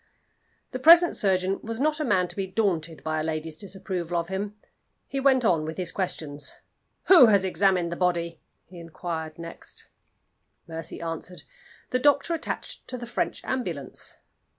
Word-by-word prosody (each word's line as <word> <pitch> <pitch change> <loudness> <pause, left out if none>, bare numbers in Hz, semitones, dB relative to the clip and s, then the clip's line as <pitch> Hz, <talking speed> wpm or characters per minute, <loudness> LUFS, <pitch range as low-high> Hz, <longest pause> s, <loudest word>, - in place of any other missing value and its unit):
The 255 - -4
present 335 +5 +8
surgeon 190 -1 +2
was 225 +1 -5
not 305 +2 +1
a - - 0
man 190 -9 +2
to - - -7
be 195 -1 -2
daunted 175 -6 -1
by 155 0 -1
a - - -1
lady's 155 0 -3
disapproval 185 -3 -4
of 170 +1 -4
him. 200 +2 -3 0.5
He 275 - -3
went 265 -2 +4
on 165 -7 +3
with 160 +1 -5
his 180 -2 -1
questions. 150 -6 -3 0.5
"Who 340 -10 +8
has 200 -3 +4
examined 185 -2 +2
the - - -2
body?" 170 -2 0 0.3
he 180 0 -12
inquired 165 -1 -5
next. 165 0 -7 0.8
Mercy 165 0 -7
answered, 170 +2 -5 0.5
"The 255 - +2
doctor 290 +4 +3
attached 330 - -4
to 255 - -5
the 240 - -6
French 235 - -2
ambulance." 175 - -3
185 Hz, 160 wpm, -26 LUFS, 165-230 Hz, 0.8 s, present